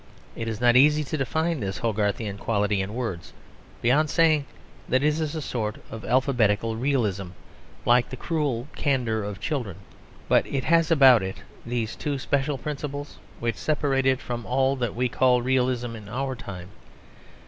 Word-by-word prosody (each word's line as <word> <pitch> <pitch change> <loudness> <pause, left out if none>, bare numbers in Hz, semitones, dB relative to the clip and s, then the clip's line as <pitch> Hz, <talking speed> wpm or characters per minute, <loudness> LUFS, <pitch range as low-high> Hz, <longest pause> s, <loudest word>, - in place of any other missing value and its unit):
It 115 - -4
is 110 -2 -3
not 120 0 +4
easy 150 +3 +5
to 150 - -4
define 160 +4 -1
this 95 -3 -3
Hogarthian 105 -2 -1
quality 105 -2 0
in 100 +3 -5
words, 115 -9 -4 0.5
beyond 145 +6 +3
saying 155 -4 +3 0.4
that 130 +2 +2
it - - +3
is 150 0 0
a 155 - -3
sort 110 -5 -2 0.2
of 110 - -7
alphabetical 115 -4 +1
realism, 110 -7 0 0.6
like 120 0 +4
the 130 - -7
cruel 145 -5 -2
candour 125 -6 0
of 100 -1 -5
children. 115 - -3 0.5
But - - +3
it 135 -2 -2
has 165 -1 +3
about 135 -8 +7
it 95 0 -6 0.2
these 115 -2 -2
two 145 -2 -2
special 140 +1 -1
principles 145 +1 -6 0.2
which 115 -2 -2
separate 140 -3 0
it 130 -1 +3
from 120 -3 -5
all 130 +2 +1
that 120 -4 -2
we 125 +2 +1
call 125 0 +2
realism 125 -2 0
in 105 -2 -10
our 130 +3 -2
time. 95 -6 -8
125 Hz, 165 wpm, -25 LUFS, 110-140 Hz, 0.6 s, about